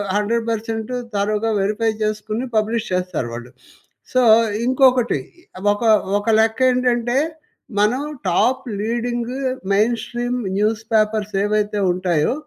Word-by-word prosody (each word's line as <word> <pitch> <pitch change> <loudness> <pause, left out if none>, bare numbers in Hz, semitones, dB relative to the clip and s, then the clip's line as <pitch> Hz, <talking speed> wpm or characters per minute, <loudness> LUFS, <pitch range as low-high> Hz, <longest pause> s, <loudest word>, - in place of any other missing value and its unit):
100% 225 +1 -1 0.2
థరోగా 210 +2 0
verify 210 +3 0
చేసుకొని 215 +3 -2
publish 220 +1 0
చేస్తారు 180 -8 -2
వాళ్ళు. 120 +1 -8 0.6
సో 255 - +4 0.4
ఇంకొకటి 255 -1 +3 0.5
ఒక 205 +3 -3 0.4
ఒక 205 - -5
లెక్క 220 +1 +2
ఏంటంటే 245 -1 +1 0.6
మనం 220 +6 +2 0.3
top 250 +9 +2 0.2
లీడింగు 240 +3 -2 0.3
main 215 +4 +3
stream 245 +1 -3 0.2
news 215 +1 +1
papers 215 -1 +1
ఏవైతే 210 0 0
ఉంటాయో 175 -1 0
220 Hz, 105 wpm, -20 LUFS, 210-240 Hz, 0.6 s, సో